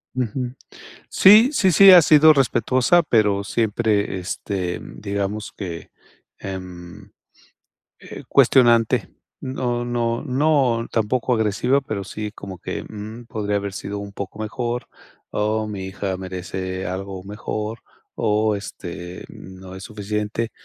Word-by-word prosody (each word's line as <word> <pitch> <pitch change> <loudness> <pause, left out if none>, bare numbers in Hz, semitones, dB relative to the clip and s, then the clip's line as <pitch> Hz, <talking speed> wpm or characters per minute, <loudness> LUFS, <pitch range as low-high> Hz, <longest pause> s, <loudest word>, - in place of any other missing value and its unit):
Ujú, 125 0 -2 0.6
sí, 215 +6 +7
sí, 190 -10 +3
sí 195 +4 +9
ha 180 -2 +10
sido 155 +1 +7
respetuosa, 130 +3 +3
pero 105 -8 +2
siempre, 105 -2 0
este, 90 0 -4
digamos 100 +1 -4
que, 85 -5 -7 0.5
em, 90 -2 -9 0.9
eh, - - -10
cuestionante. 120 -3 +4 0.3
No 125 -2 -2
no 120 -1 -1
no 130 -4 +1
tampoco 120 +3 0
agresiva, 110 +5 +1
pero 110 -6 -4
sí 105 +1 -5
como 95 -4 -9
que, - - -5
mm, 110 +3 -9
podría 105 -3 -2
haber 100 0 -4
sido 100 +1 -5
un 100 0 -7
poco 100 +1 -7
mejor, 120 +3 -3 0.4
o 110 +1 0
mi 100 -3 -5
hija 95 0 -3
merece 95 0 -5
algo 95 0 -5
mejor, 105 +2 -5 0.4
o, 105 0 +1
este, 90 -2 -8
no 95 0 -11
es 95 - -9
suficiente, 105 +1 -3
105 Hz, 120 wpm, -22 LUFS, 100-120 Hz, 0.9 s, ha